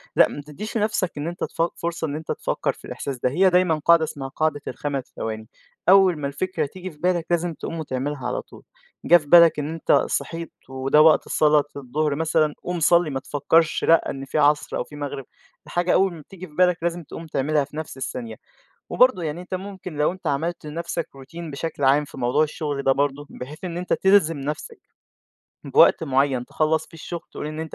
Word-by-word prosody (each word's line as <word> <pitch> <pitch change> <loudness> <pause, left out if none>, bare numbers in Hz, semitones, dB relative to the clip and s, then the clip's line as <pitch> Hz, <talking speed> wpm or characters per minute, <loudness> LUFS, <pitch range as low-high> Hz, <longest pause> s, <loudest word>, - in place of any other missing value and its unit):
لأ - - +6
ما 145 - -7
تديش 170 +11 -6
لنَفسك 210 -4 0
إن 145 +2 -3
أنت 175 +1 -5
تف - - -3
فرصة 170 -1 -3
إن 145 - -4
أنت 155 +1 -5
تفكّر - - -1
في - - -16
الإحساس 140 -2 -5
ده، 125 - 0
هي 185 +8 +4
دايمًا 180 -2 +3
قاعدة 170 -1 +6
اسمها 145 -3 -5
قاعدة 145 +1 -1
ال5 140 -3 -3
ثواني، 110 0 -5 0.4
أول 190 -3 +6
ما 140 - -2
الفكرة 160 +3 -2
تيجي 185 +5 -8
في 150 - -19
بالك 175 -2 +1
لازم 175 0 0
تقوم 165 +2 -6
وتعملها 135 -2 -3
على - - -2
طول، - - -16 0.4
جِه 175 - +8
في 150 -4 -10
بالك 170 -1 +7
إن 150 +1 -3
أنت 165 - -1
صحيت 165 -1 0 0.2
وده 135 +3 +3
وقت 155 0 +5
صلاة 150 -1 +4
الضهر 140 +2 -1
مثلًا، 155 -1 +1
قوم 175 -1 -3
صلّي، 170 0 +4
ما 135 -2 -2
تفكرش 150 +4 +1
لأ 165 0 +4
إن 135 0 -5
في 135 - -3
عصر 145 0 +2
أو - - -1
في 150 - -14
مغرب، 145 -2 -5 0.4
الحاجة 175 +1 0
أول 190 -1 +3
ما 165 - -10
بتيجي 185 +4 -11
في 150 - -20
بالك 180 0 +4
لازم 170 0 -1
تقوم 165 +2 -9
تعملها 150 0 +1
في 145 +2 -11
نَفس 155 -3 -6
الثانية، 120 -3 -5 0.6
وبرضو 255 -7 +4
يعني 160 +1 -3
أنت 180 +1 -7
ممكن 185 -3 -7
لو 150 +4 +2
أنت 185 -2 -12
عملت 155 +3 -2
لنَفسك 165 +1 -4
routine 160 +5 -9
بشكل 145 0 -4
عام 140 +3 +4
في 140 - -12
موضوع 125 +4 +2
الشغل 145 -2 -4
ده 135 - +4
برضو، 145 +1 -1
بحيث 145 +7 -9
إن 170 -2 -4
أنت 180 +1 -3
تلزِم 190 -5 +3
نَفسك 150 +2 -5 0.9
بوقت - - +5
معيّن 135 -2 +1
تخلّص 155 +4 0
فيه - - -19
الشغل، 170 +2 -6
تقول - - -5
إن 155 +1 -5
أنت 160 -1 -6
155 Hz, 205 wpm, -23 LUFS, 145-170 Hz, 0.9 s, جِه